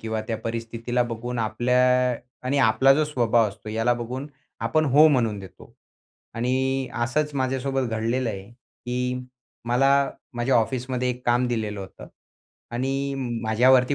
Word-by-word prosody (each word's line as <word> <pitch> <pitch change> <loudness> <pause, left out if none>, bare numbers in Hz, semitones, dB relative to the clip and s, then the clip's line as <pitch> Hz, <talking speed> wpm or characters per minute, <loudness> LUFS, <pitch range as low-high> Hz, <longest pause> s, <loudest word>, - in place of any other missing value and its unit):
किंवा 110 -1 -3
त्या 115 - -2
परिस्थितीला 115 +2 -2
बघून 120 +1 -4
आपल्या 120 +3 +1 0.7
आणि 140 +2 +1
आपला 130 +2 +5
जो 155 +2 +2
स्वभाव 120 -6 +2
असतो 105 +2 -11
याला 115 +3 +1
बघून 125 +3 -5 0.4
आपण 155 +7 +2
हो 145 +2 +6
म्हणून 115 -8 +1
देतो 95 -1 -13 0.6
आणि 130 +2 0 0.2
असंच 150 +4 -1
माझ्यासोबत 135 -1 -1
घडलेलंय, 115 -2 -1
की 125 +1 -5 0.5
मला 125 +3 +3 0.4
माझ्या 120 +2 +1
ऑफिसमध्ये 125 +2 0
एक 125 0 -7
काम 120 +1 +3
दिलेलं 110 -4 -2
होतं 95 - -10 0.7
आणि 135 +2 -1 0.3
माझ्यावरती 125 +4 +4
125 Hz, 130 wpm, -24 LUFS, 115-130 Hz, 0.7 s, हो